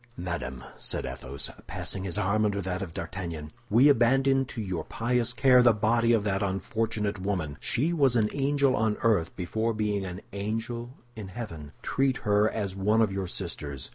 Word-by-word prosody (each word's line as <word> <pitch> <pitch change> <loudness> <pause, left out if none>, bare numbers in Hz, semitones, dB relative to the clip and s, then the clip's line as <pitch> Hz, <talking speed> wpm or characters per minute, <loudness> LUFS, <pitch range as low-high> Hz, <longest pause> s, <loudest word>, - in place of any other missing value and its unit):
"Madame," 85 -8 -4 0.2
said - - -2
Athos, 70 +2 -5 0.2
passing 95 0 -3
his 90 -1 -2
arm 105 +2 +2
under 100 -1 +1
that 95 0 -3
of 95 -4 -4
D'Artagnan, 85 -3 -5 0.2
"we 120 +7 +6
abandon 135 +1 +4
to 120 - -7
your 95 -5 -3
pious 120 0 0
care 125 0 +5
the 120 -2 +6
body 115 +2 +2
of 115 -3 +3
that 100 -1 0
unfortunate 105 +1 -1
woman. 90 -7 -2
She 155 +8 0
was 135 -6 +3
an 110 -3 +3
angel 140 -1 +2
on 110 0 +1
earth 100 -8 +2
before 110 +5 -1
being 105 -2 0
an 90 0 -6
angel 115 +4 -4 0.2
in 105 -3 -7
heaven. 90 -9 -7
Treat 135 -1 +1
her 105 +1 +4
as 100 -4 -3
one 105 +4 +3
of 105 - +1
your 95 -1 -2
sisters. 70 -5 -5
105 Hz, 175 wpm, -28 LUFS, 95-120 Hz, 0.2 s, we